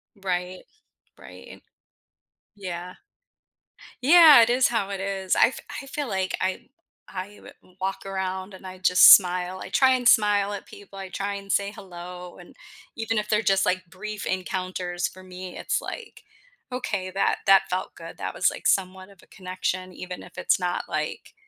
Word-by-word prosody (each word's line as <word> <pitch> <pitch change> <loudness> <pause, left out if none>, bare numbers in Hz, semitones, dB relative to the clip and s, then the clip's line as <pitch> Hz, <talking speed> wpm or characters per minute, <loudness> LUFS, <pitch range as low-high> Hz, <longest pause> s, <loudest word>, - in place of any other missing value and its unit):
Right. 185 -2 -4 0.6
Right. - - -13 0.9
Yeah. 180 -2 -7 1.1
Yeah. 310 -2 +9
It 230 - +4
is 250 +1 +4
how 225 -4 -1
it 195 -1 -4
is. 195 -1 -1
I - - +6
f 255 - -7 0.2
I 275 - -11
feel 280 0 -4
like 190 -2 -1
I 185 +6 -3 0.4
I 195 +2 -7
w - - -13 0.3
walk 190 +1 -3
around 190 0 -4
and 190 0 -12
I 185 0 -8
just 180 0 +9
smile. 180 0 -2
I - - -8
try 265 -1 +4
and 250 -2 +1
smile 205 -3 +4
at 205 - -7
people. 200 -1 -13
I 190 -1 -7
try 200 +3 -3
and 195 0 -6
say 200 +1 +1
hello. 180 -2 -10
And 175 - -15 0.4
even 225 0 -2
if 210 - -1
they're 210 0 +2
just, 195 -2 +2
like, 185 -1 -1
brief 210 +3 -7
encounters 185 -1 -3
for 185 0 -13
me, 185 0 -9
it's - - -1
like, 460 -3 -9 0.5
"Okay. 200 -7 -3
That 195 - 0
that 195 0 +7
felt 185 +1 -3
good." - - -11
That - - -5
was, - - +3
like, - - -3
somewhat 185 0 0
of 195 -2 -19
a - - -21
connection 185 0 -4
even 180 0 -8
if - - -16
it's - - +1
not, 180 -1 -2
like, - - -4
190 Hz, 175 wpm, -25 LUFS, 185-205 Hz, 1.1 s, Yeah